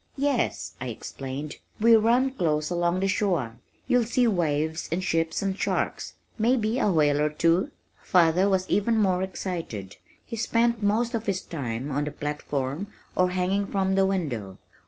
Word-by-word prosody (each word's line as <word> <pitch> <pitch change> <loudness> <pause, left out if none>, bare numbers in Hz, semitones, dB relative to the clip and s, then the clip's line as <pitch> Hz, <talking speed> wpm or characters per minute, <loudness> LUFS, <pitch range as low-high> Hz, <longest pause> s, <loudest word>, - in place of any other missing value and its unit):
"Yes," 235 - 0
I 130 - -3
explained, 135 +4 -6 0.2
"we 230 +1 +6
run 240 +4 +3
close 155 - 0
along 175 +1 +1
the 195 - +2
shore. 175 - 0 0.3
You'll 245 -2 +3
see 245 +2 +2
waves 160 -5 0
and 180 +3 -1
ships 165 0 0
and 195 -1 -1
sharks - - -2 0.2
may 235 +4 +4
be 225 +2 0
a 210 - +2
whale 150 -3 +3
or 150 - +2
two." 165 +4 +2 0.3
Father 180 +2 +3
was 190 -1 +1
even 225 +3 +2
more 190 -4 +2
excited. 170 - -5 0.3
He 230 - -6
spent 235 0 +1
most 220 +4 +1
of 230 -1 -3
his 190 -2 0
time 135 -4 -4
on 145 +2 0
the 150 - -4
platform 145 +2 -3 0.3
or 185 0 +3
hanging 185 +2 0
from 190 -1 0
the 190 0 +3
window. 125 - -3
185 Hz, 165 wpm, -26 LUFS, 150-210 Hz, 0.3 s, we